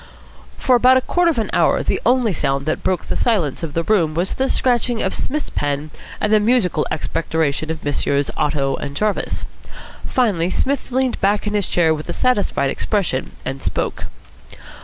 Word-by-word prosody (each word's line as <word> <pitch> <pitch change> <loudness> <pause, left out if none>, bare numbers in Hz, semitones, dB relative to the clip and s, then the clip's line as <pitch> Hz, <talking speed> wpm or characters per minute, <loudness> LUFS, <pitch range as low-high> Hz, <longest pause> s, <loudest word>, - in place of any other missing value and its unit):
For 255 - +3
about 255 +2 +6
a - - +2
quarter 350 +6 +2
of 320 - -1
an 225 - -1
hour - - +3
the - - -1
only 245 -4 +3
sound 135 -3 -1
that 155 - -1
broke 185 -3 -1
the - - -3
silence 185 - 0
of 160 -3 -5
the 165 - +1
room 165 -6 +2
was 175 +3 0
the 265 0 -1
scratching 240 -2 +1
of 190 - 0
Psmith's 300 +3 -3
pen 145 +1 -2 0.3
and 210 - +1
the 215 - +6
musical 210 -8 +2
expectoration 160 -1 -1
of 160 -1 -4
Messrs. 140 -1 0
Otto 140 -2 0
and 140 0 -6
Jarvis. 210 -1 -1 0.6
Finally 200 -9 +1
Psmith 270 +7 -1
leaned 260 0 0
back 205 +2 +2
in 210 - -2
his 205 -2 0
chair 165 -2 +3
with 155 0 -6
a - - -1
satisfied 205 - +1
expression, 190 -11 -1
and 135 +1 -4
spoke. - - -2
185 Hz, 180 wpm, -20 LUFS, 155-240 Hz, 0.6 s, about